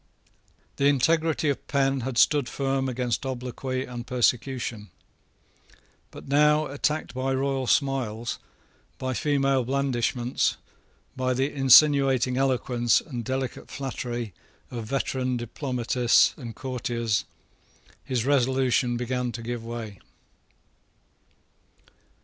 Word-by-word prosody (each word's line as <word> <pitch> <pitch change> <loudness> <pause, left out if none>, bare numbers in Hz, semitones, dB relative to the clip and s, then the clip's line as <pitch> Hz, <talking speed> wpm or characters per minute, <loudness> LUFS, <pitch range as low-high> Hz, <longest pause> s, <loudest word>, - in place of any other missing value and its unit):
The 140 - +1
integrity 155 +3 +2
of 140 - -3
Penn 135 -1 +1
had 125 0 -4
stood 145 -2 +4
firm 135 -1 -1
against 125 -1 -2
obloquy 130 0 -4
and 120 -1 -7
persecution. 125 -3 -1 1.2
But - - -12
now, 150 +2 +4
attacked 150 +2 -2
by 130 +1 -1
royal 135 -1 -1
smiles, 120 -5 0 0.6
by 130 0 -3
female 135 -1 +1
blandishments, 125 -1 0 0.6
by 130 -1 0
the 135 +3 0
insinuating 135 -2 +5
eloquence 125 -3 +2
and 125 -7 -6
delicate 130 +1 -4
flattery 120 -5 -4 0.4
of 115 -2 -5
veteran 130 -1 -1
diplomatists 120 0 +2
and 115 -5 -8
courtiers, 120 -3 -2 0.8
his 125 -3 -1
resolution 130 -2 +2
began 125 0 -2
to 115 - -6
give 120 0 -4
way. 115 -4 -7
130 Hz, 105 wpm, -26 LUFS, 120-135 Hz, 1.2 s, insinuating